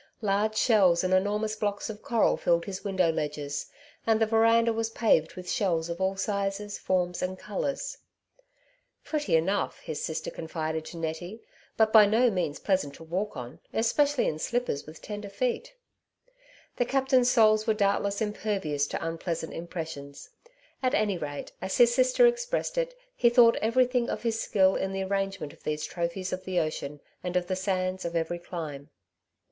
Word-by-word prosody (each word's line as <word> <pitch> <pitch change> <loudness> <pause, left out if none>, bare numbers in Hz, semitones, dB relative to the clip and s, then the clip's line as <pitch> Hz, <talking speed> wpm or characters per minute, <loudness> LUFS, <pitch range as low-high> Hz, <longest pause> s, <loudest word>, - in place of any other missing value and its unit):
Large 210 +2 +1
shells 190 -8 +4
and 185 0 +1
enor 200 +3 +2
mous 215 0 -2
blocks 205 -2 -2
of 215 -1 -7
coral 230 -2 +2
filled 170 -1 +1
his 195 -1 -6
window 190 -4 +2
ledges, 150 -2 -3 0.4
and 220 -1 +4
the 225 - +4
verandah 230 +1 +4
was 225 0 -1
paved 215 -9 +2
with 180 - -8
shells^ 170 -3 0
of 170 +2 -5
all 190 +1 +1
sizes, 200 +1 -2
forms, 180 -1 0
and 185 +1 -2
colours. 275 - -3 0.5
" - - -37 0.3
Pretty 295 - 0
enough,^^ 190 +5 0
his 155 - -4
sister 160 - -3
confided 160 -1 -4
to 170 - -8
Nettie, 165 +6 -5
^* - - -38 0.3
but 220 -1 +3
by 215 -2 +9
no 230 +3 +4
means 170 -7 -1
pleasant 185 -8 0
to - - -12
walk 180 +2 -3
on, 125 +6 -8
especially 280 +4 +2
in 155 - -2
slippers 240 -7 -1
and - - -13
with 155 +1 -12
tender 205 -1 -6
feet.^^ 245 +5 -2 1.1
The 245 - +2
captain's 260 -1 +3
soles 215 -2 +4
were 220 - +3
doubtless 200 0 +1
impervious 195 -9 -1
to - - -4
un 165 0 -3
pleasant 165 -2 -3
impressions 160 -4 -7 0.2
\ - - -34
at 255 -1 +2
any 205 -4 +1
rate, 145 -2 -5
as 190 +1 -2
his 240 -1 +6
sister 255 - +4
ex 480 0 +3
pressed - - -1
it - - -1 0.2
he 235 - +4
thought 235 -1 +6
everything 245 +2 +2
of - - -3
his 225 -1 0
skill 190 -2 +3
in 190 0 -2
the 195 0 -1
arrangement 195 -5 -2
of - - -21
these 155 0 -2
trophies 175 +2 -3
of 185 0 -4
the 185 -1 0
ocean 150 -2 -3 0.2
and 180 0 -3
of 180 -1 +2
the 185 +1 -2
sands 185 0 -1
of 170 0 -4
every 165 +1 -1
clime. 155 -5 -7
195 Hz, 185 wpm, -28 LUFS, 170-220 Hz, 1.1 s, by